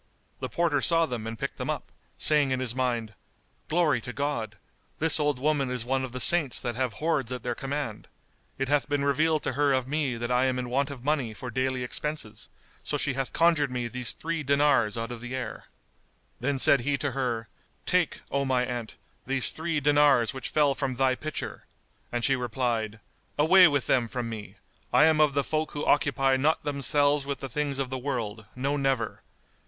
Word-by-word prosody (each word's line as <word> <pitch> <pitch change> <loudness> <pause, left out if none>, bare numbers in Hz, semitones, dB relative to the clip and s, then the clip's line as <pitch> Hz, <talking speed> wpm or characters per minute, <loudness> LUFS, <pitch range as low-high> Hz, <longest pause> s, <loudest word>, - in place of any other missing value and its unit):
The - - -4
porter 165 -5 +1
saw 165 +7 +5
them 120 -6 -5
and 115 0 -5
picked - - -4
them - - -4
up, - - -4 0.3
saying 150 -3 +3
in 130 -1 0
his 125 -3 -1
mind, 120 -4 -1 0.6
"Glory 155 -7 +2
to 125 - -6
God! 120 -6 -3 0.4
This 160 0 +2
old 150 -2 +1
woman 140 0 0
is 125 -2 -3
one 130 +1 0
of 130 - -5
the 125 - -5
Saints 155 -3 +5
that 120 - -3
have 125 -2 -1
hoards 150 -6 -1
at 125 -2 -5
their 120 - -1
command! 135 -4 -5 0.5
It 135 - -1
hath 145 +1 +1
been 145 -1 0
revealed 155 +2 +2
to - - -1
her 145 +1 +2
of 130 -1 0
me 140 -4 -1
that 120 +1 -3
I 125 +1 +3
am 130 -1 0
in 125 -1 -4
want 140 +2 +1
of 135 -4 -8
money 135 -6 -1
for 125 +2 -7
daily 130 +1 -1
expenses; 125 -5 -6 0.3
so 145 - -2
she 145 -1 0
hath 135 0 -3
conjured 165 -4 +3
me 125 -1 -3
these 125 0 -5
three 165 0 -3
dinars 140 -6 +2
out 115 +1 -4
of 120 -2 -7
the 125 +1 -5
air." 130 - -5 0.7
Then 140 +2 -1
said 135 +1 +5
he 140 +3 0
to 140 +1 -2
her, 120 -4 -2 0.4
"Take, - - +1
O 140 0 +1
my 130 -2 +1
aunt, 120 -3 -5 0.3
these 135 -1 +1
three 160 -1 -2
dinars 145 -5 +4
which 130 -3 -5
fell 145 -2 +3
from 135 -2 -3
thy 130 0 +2
pitcher;" 155 +4 -6 0.5
and 120 -1 0
she 135 - +4
replied, 120 -3 -2 0.4
"Away 180 +5 +7
with 145 -4 0
them 120 -3 +2
from 120 0 -4
me! 110 -2 -8 0.4
I - - +5
am 155 -1 +4
of 150 -2 +3
the 140 - +2
folk 155 +1 -2
who 145 - -3
occupy 135 -2 +2
not 150 +4 +1
themselves 145 0 +1
with 140 -1 -3
the 135 - -6
things 145 +2 -2
of 135 -2 -3
the 130 - -3
world, 115 -6 -4
no 140 +3 -1
never! 135 -5 -1
135 Hz, 205 wpm, -27 LUFS, 125-145 Hz, 0.7 s, Away